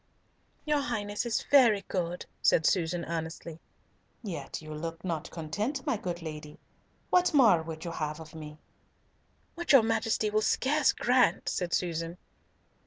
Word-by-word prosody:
"Your 300 Hz, -1 st, +2 dB
Highness 215 Hz, -4 st, -2 dB
is 230 Hz, -, 0 dB
very 230 Hz, -8 st, +5 dB
good," 175 Hz, -2 st, -3 dB, 0.2 s
said 160 Hz, -, +3 dB
Susan 175 Hz, -1 st, +1 dB
earnestly. 165 Hz, 0 st, -5 dB, 0.6 s
"Yet 190 Hz, -7 st, -5 dB
you 155 Hz, -1 st, -9 dB
look 165 Hz, +3 st, -6 dB
not 165 Hz, -4 st, -3 dB
yet -, -, -17 dB
content, 205 Hz, -, -3 dB
my -, -, +1 dB
good 175 Hz, -4 st, -5 dB
lady. 150 Hz, -2 st, -8 dB, 0.5 s
What 360 Hz, -3 st, +3 dB
more 220 Hz, -, +6 dB
would 160 Hz, 0 st, -7 dB
you 170 Hz, -, -3 dB
have 155 Hz, -1 st, -4 dB
of 160 Hz, -1 st, -11 dB
me?" 155 Hz, -1 st, -9 dB, 1.0 s
"What 345 Hz, -3 st, 0 dB
your 265 Hz, -5 st, +8 dB
Majesty 225 Hz, -1 st, 0 dB
will 215 Hz, 0 st, +2 dB
scarce 290 Hz, +6 st, +2 dB
grant," 250 Hz, 0 st, +2 dB
said 180 Hz, -2 st, -2 dB
Susan. 170 Hz, 0 st, -2 dB
180 Hz, 150 wpm, -29 LUFS, 160-230 Hz, 1.0 s, your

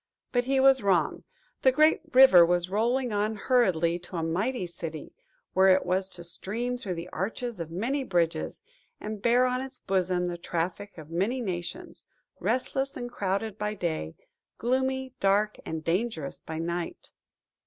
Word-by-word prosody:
But 245 Hz, -1 st, +1 dB
he 270 Hz, +1 st, +2 dB
was 265 Hz, -1 st, +6 dB
wrong. 180 Hz, -6 st, +1 dB, 0.4 s
The 260 Hz, -, +5 dB
great 310 Hz, +4 st, +4 dB
river 255 Hz, -10 st, +9 dB
was 175 Hz, +1 st, +1 dB
rolling 240 Hz, +3 st, +1 dB
on 210 Hz, +2 st, 0 dB
hurriedly 185 Hz, -8 st, +2 dB
to 180 Hz, +1 st, -10 dB
a 165 Hz, -, -1 dB
mighty 190 Hz, +8 st, -1 dB
city, 165 Hz, -3 st, -7 dB, 0.4 s
where 190 Hz, +1 st, +5 dB
it 190 Hz, 0 st, +5 dB
was 185 Hz, +1 st, 0 dB
to 175 Hz, -2 st, -10 dB
stream 225 Hz, +8 st, -3 dB
through 205 Hz, -8 st, -4 dB
the 170 Hz, +1 st, -6 dB
arches 225 Hz, +4 st, -4 dB
of 165 Hz, -1 st, -4 dB
many 240 Hz, -, -1 dB
bridges, 170 Hz, -7 st, -1 dB, 0.4 s
and 210 Hz, -1 st, -6 dB
bear 245 Hz, +3 st, +4 dB
on 250 Hz, 0 st, 0 dB
its 265 Hz, -1 st, -8 dB
bosom 185 Hz, -2 st, 0 dB
the 175 Hz, -1 st, -4 dB
traffic 175 Hz, +4 st, -3 dB
of 155 Hz, 0 st, -11 dB
many 200 Hz, +10 st, 0 dB
nations; 210 Hz, -, -5 dB, 0.3 s
restless 270 Hz, +1 st, -1 dB
and 245 Hz, -1 st, -5 dB
crowded 200 Hz, 0 st, -2 dB
by 210 Hz, 0 st, -2 dB
day; 160 Hz, -, -3 dB, 0.4 s
gloomy, 260 Hz, +1 st, 0 dB
dark, 205 Hz, +2 st, +2 dB
and 160 Hz, -1 st, -4 dB
dangerous 170 Hz, -4 st, -2 dB
by 160 Hz, -, -6 dB
night! 170 Hz, +1 st, -4 dB
195 Hz, 160 wpm, -28 LUFS, 175-245 Hz, 0.4 s, river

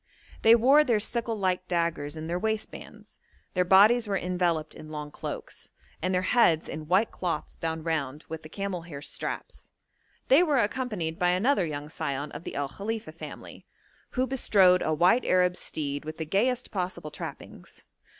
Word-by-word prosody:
They 225 Hz, +1 st, +7 dB
wore 270 Hz, +6 st, +6 dB
their 235 Hz, -7 st, +2 dB
sickle 230 Hz, +1 st, -2 dB
like 185 Hz, -2 st, -1 dB
daggers 170 Hz, -4 st, -1 dB
in 155 Hz, -, -5 dB
their 170 Hz, +2 st, -2 dB
waistbands; 220 Hz, +1 st, -5 dB, 0.3 s
their 180 Hz, -, +2 dB
bodies 210 Hz, +6 st, +6 dB
were 200 Hz, -1 st, 0 dB
enveloped 175 Hz, -3 st, -1 dB
in 155 Hz, -, -11 dB
long 150 Hz, -1 st, -6 dB
cloaks, -, -, -7 dB, 0.3 s
and 185 Hz, +3 st, 0 dB
their 180 Hz, 0 st, +1 dB
heads 185 Hz, -7 st, +3 dB
in 155 Hz, -1 st, -6 dB
white 190 Hz, +6 st, +3 dB
cloths 170 Hz, -4 st, -3 dB
bound 160 Hz, -1 st, -4 dB
round 150 Hz, -3 st, -2 dB
with 160 Hz, 0 st, -6 dB
the 155 Hz, -, -11 dB
camel 195 Hz, -1 st, -4 dB
hair 150 Hz, -4 st, -9 dB
straps; 145 Hz, -, -5 dB, 0.5 s
they 275 Hz, +6 st, +6 dB
were 305 Hz, -6 st, +2 dB
accompanied 210 Hz, -8 st, -1 dB
by 180 Hz, -, +3 dB
another 190 Hz, +1 st, +2 dB
young 145 Hz, -1 st, -5 dB
scion 145 Hz, -1 st, -4 dB
of -, -, -9 dB
the -, -, -6 dB
El 140 Hz, -1 st, -1 dB
Khalifa 210 Hz, 0 st, -5 dB
family, 160 Hz, -, -10 dB, 0.5 s
who 255 Hz, -, +3 dB
bestrode 195 Hz, -8 st, +4 dB
a 155 Hz, -, 0 dB
white 175 Hz, +10 st, +4 dB
Arab 180 Hz, -1 st, +3 dB
steed 145 Hz, -4 st, -4 dB
with 155 Hz, +1 st, -7 dB
the 160 Hz, -, -3 dB
gayest 240 Hz, +9 st, 0 dB
possible 180 Hz, -5 st, -4 dB
trappings. -, -, -9 dB
180 Hz, 170 wpm, -27 LUFS, 155-215 Hz, 0.5 s, They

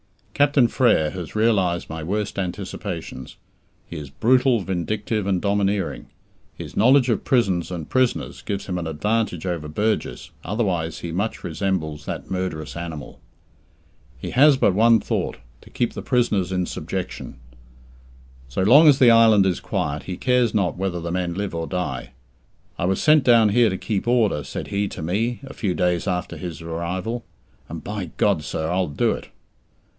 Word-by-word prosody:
Captain 145 Hz, -3 st, +4 dB
Frere 110 Hz, -, +2 dB
has 90 Hz, +1 st, -7 dB
realized 100 Hz, -6 st, +1 dB
my 80 Hz, 0 st, -6 dB
worst 100 Hz, +5 st, -2 dB
anticipations. 90 Hz, -7 st, -5 dB, 0.5 s
He -, -, -7 dB
is 75 Hz, -2 st, -7 dB
brutal, 125 Hz, -, +3 dB
vindictive, 100 Hz, +3 st, -2 dB
and 95 Hz, -2 st, +1 dB
domineering. 100 Hz, -8 st, -1 dB, 0.5 s
His -, -, -8 dB
knowledge 130 Hz, +3 st, +5 dB
of 110 Hz, -, -1 dB
prisons 95 Hz, -9 st, +1 dB
and 85 Hz, -4 st, -5 dB
prisoners 130 Hz, -2 st, 0 dB
gives 100 Hz, -2 st, -4 dB
him 90 Hz, -2 st, -3 dB
an 85 Hz, -, -4 dB
advantage 100 Hz, +2 st, -1 dB
over 85 Hz, -4 st, -3 dB
Burgess, 105 Hz, +8 st, -2 dB
otherwise 90 Hz, -6 st, -2 dB
he 85 Hz, -, -5 dB
much 100 Hz, +6 st, -2 dB
resembles 80 Hz, -3 st, -2 dB
that -, -, -6 dB
murderous 90 Hz, -5 st, -3 dB
animal. 80 Hz, -5 st, -7 dB, 1.0 s
He -, -, -6 dB
has 140 Hz, +2 st, +6 dB
but 100 Hz, -, +3 dB
one 115 Hz, +3 st, +5 dB
thought -, -, -2 dB, 0.2 s
to -, -, -16 dB
keep -, -, -1 dB
the -, -, -6 dB
prisoners 105 Hz, -7 st, +1 dB
in 90 Hz, -1 st, 0 dB
subjection. -, -, -5 dB, 1.1 s
So 65 Hz, +9 st, -2 dB
long 140 Hz, +11 st, +7 dB
as 145 Hz, -3 st, +7 dB
the 125 Hz, -3 st, +6 dB
island 110 Hz, -3 st, +6 dB
is 95 Hz, -3 st, 0 dB
quiet, 75 Hz, +1 st, -3 dB
he 90 Hz, -2 st, -5 dB
cares 125 Hz, -4 st, +2 dB
not 100 Hz, -4 st, +1 dB
whether 95 Hz, -2 st, -2 dB
the 85 Hz, 0 st, -4 dB
men 90 Hz, -1 st, -2 dB
live 100 Hz, -1 st, -3 dB
or 80 Hz, 0 st, -3 dB
die. 65 Hz, -8 st, -4 dB, 0.7 s
"I 85 Hz, -, 0 dB
was 95 Hz, +1 st, +1 dB
sent 155 Hz, -2 st, +5 dB
down 115 Hz, -4 st, +5 dB
here 115 Hz, +2 st, +4 dB
to 95 Hz, -, -3 dB
keep 105 Hz, +2 st, -3 dB
order," 110 Hz, -11 st, +2 dB
said -, -, -6 dB
he 100 Hz, 0 st, 0 dB
to 80 Hz, -, -7 dB
me, 110 Hz, -, -1 dB
a 135 Hz, -, -9 dB
few 95 Hz, -6 st, -2 dB
days 90 Hz, -2 st, 0 dB
after 90 Hz, -1 st, -2 dB
his 85 Hz, -3 st, -6 dB
arrival, 90 Hz, +8 st, -3 dB, 0.5 s
"and 80 Hz, 0 st, -7 dB
by 100 Hz, -5 st, -5 dB
God, 75 Hz, -, +2 dB
sir, 80 Hz, +2 st, -3 dB
I'll 90 Hz, 0 st, +1 dB
do 70 Hz, -, +1 dB
it!" -, -, -6 dB
95 Hz, 170 wpm, -23 LUFS, 85-115 Hz, 1.1 s, long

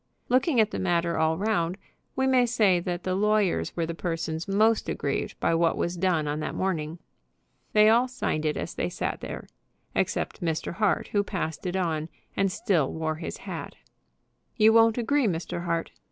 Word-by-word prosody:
Looking 255 Hz, +2 st, +3 dB
at 215 Hz, -1 st, +3 dB
the -, -, -3 dB
matter 170 Hz, -2 st, +1 dB
all 160 Hz, 0 st, +2 dB
round, 190 Hz, -4 st, 0 dB, 0.4 s
we 265 Hz, -, +1 dB
may 255 Hz, -2 st, +4 dB
say 210 Hz, -7 st, +3 dB
that 175 Hz, 0 st, -4 dB
the 185 Hz, -, -1 dB
lawyers 210 Hz, -1 st, +1 dB
were 170 Hz, -, 0 dB
the 165 Hz, -, -4 dB
persons 165 Hz, -1 st, -3 dB
most 215 Hz, +3 st, +2 dB
aggrieved -, -, -2 dB
by -, -, +2 dB
what 165 Hz, 0 st, +2 dB
was 170 Hz, +1 st, -1 dB
done 170 Hz, -4 st, +1 dB
on 145 Hz, +1 st, -2 dB
that -, -, -4 dB
morning. 165 Hz, -4 st, -2 dB, 0.8 s
They 210 Hz, 0 st, +6 dB
all 235 Hz, +3 st, +5 dB
signed 200 Hz, -10 st, -2 dB
it 155 Hz, -1 st, 0 dB
as -, -, -4 dB
they -, -, -2 dB
sat -, -, -3 dB
there, -, -, -6 dB, 0.5 s
except -, -, -1 dB
Mr. 165 Hz, -2 st, -2 dB
Hart, 215 Hz, +3 st, +1 dB
who 205 Hz, -1 st, +1 dB
passed 185 Hz, -3 st, -4 dB
it 180 Hz, -, -2 dB
on, 165 Hz, -4 st, -1 dB, 0.3 s
and 195 Hz, -1 st, +1 dB
still 170 Hz, -8 st, +1 dB
wore 160 Hz, -1 st, -2 dB
his -, -, -5 dB
hat. -, -, -6 dB, 0.8 s
"You 220 Hz, 0 st, +6 dB
won't 225 Hz, 0 st, +5 dB
agree, 250 Hz, +2 st, +2 dB
Mr. 175 Hz, -1 st, -3 dB
Hart?" 170 Hz, -1 st, -1 dB
180 Hz, 180 wpm, -27 LUFS, 165-215 Hz, 0.8 s, They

